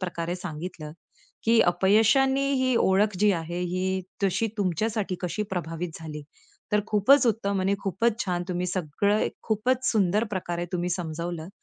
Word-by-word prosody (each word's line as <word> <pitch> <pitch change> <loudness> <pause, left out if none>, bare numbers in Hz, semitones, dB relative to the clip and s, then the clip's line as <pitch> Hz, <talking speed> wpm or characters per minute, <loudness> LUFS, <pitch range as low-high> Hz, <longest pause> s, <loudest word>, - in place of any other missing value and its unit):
प्रकारे 175 -1 -3
सांगितलं, 160 -3 -7 0.5
की 225 0 +5
अपयशांनी 225 +10 +3
ही 255 -1 +2
ओळख 195 +1 +2
जी 210 -1 +5
आहे, 170 0 -3
ही 185 +1 -1 0.2
तशी 195 +4 +1
तुमच्यासाठी 205 +1 -1
कशी 180 +4 -2
प्रभावित 165 -2 -4
झाली. 150 -2 -7 0.5
तर 210 - +4
खूपच 245 +6 +4
उत्तम 200 -4 0
आणि 195 +2 +2
खूपच 210 +4 0
छान. 175 -2 -1
तुम्ही 180 0 -1
सगळं 185 +4 0 0.2
खूपच 245 +4 0
सुंदर 210 0 +2
प्रकारे 175 -1 -3 0.3
समजावलं. 170 0 -5
190 Hz, 135 wpm, -26 LUFS, 175-215 Hz, 0.5 s, की